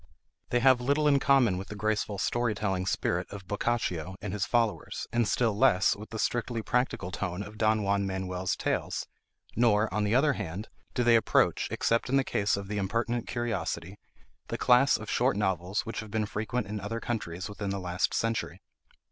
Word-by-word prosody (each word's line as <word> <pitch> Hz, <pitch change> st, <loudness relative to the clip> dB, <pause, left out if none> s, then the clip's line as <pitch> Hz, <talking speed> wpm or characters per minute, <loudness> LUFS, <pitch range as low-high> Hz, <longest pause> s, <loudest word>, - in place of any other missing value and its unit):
They 120 Hz, -, +1 dB
have 130 Hz, -1 st, +5 dB
little 145 Hz, +4 st, +2 dB
in 140 Hz, -1 st, +5 dB
common 125 Hz, -10 st, +3 dB
with 95 Hz, -, -7 dB
the 105 Hz, -, -7 dB
graceful 105 Hz, 0 st, -1 dB
story 115 Hz, +1 st, 0 dB
telling 95 Hz, -3 st, -1 dB
spirit 90 Hz, -1 st, 0 dB
of 100 Hz, -2 st, -9 dB
Boccaccio 95 Hz, -5 st, -1 dB
and 105 Hz, -2 st, -5 dB
his 100 Hz, -1 st, -1 dB
followers, 115 Hz, -3 st, 0 dB
and 120 Hz, -2 st, +2 dB
still 115 Hz, 0 st, +1 dB
less 100 Hz, -2 st, +4 dB
with 105 Hz, +2 st, -10 dB
the 110 Hz, -, -6 dB
strictly 115 Hz, 0 st, -1 dB
practical 125 Hz, -8 st, -1 dB
tone 95 Hz, -1 st, -3 dB
of 105 Hz, +1 st, -11 dB
Don 110 Hz, -1 st, +2 dB
Juan 100 Hz, 0 st, +1 dB
Manuel's 95 Hz, -1 st, -2 dB
tales; -, -, -2 dB, 0.5 s
nor, 110 Hz, -3 st, +3 dB
on 105 Hz, +1 st, +1 dB
the 105 Hz, +3 st, +1 dB
other 145 Hz, +2 st, +4 dB
hand, 100 Hz, -1 st, -5 dB, 0.3 s
do 125 Hz, -, +2 dB
they 120 Hz, -1 st, +5 dB
approach, 110 Hz, -2 st, +3 dB
except 115 Hz, +2 st, 0 dB
in 135 Hz, -, +3 dB
the 135 Hz, -, +3 dB
case 100 Hz, -5 st, 0 dB
of 100 Hz, -1 st, -6 dB
the 105 Hz, 0 st, -2 dB
'Impertinent 115 Hz, +4 st, -1 dB
Curiosity,' 100 Hz, -6 st, -3 dB, 0.5 s
the -, -, -3 dB
class 125 Hz, +3 st, +5 dB
of 110 Hz, -, -9 dB
short 120 Hz, -2 st, +1 dB
novels 95 Hz, 0 st, 0 dB
which 115 Hz, -2 st, -5 dB
have 110 Hz, -, -7 dB
been 110 Hz, 0 st, 0 dB
frequent 110 Hz, +2 st, -2 dB
in 105 Hz, +1 st, -4 dB
other 105 Hz, +3 st, -4 dB
countries 95 Hz, -7 st, -4 dB
within 105 Hz, -1 st, -5 dB
the 100 Hz, -, -2 dB
last 90 Hz, 0 st, -1 dB
century. 115 Hz, 0 st, -1 dB
105 Hz, 190 wpm, -29 LUFS, 95-120 Hz, 0.5 s, have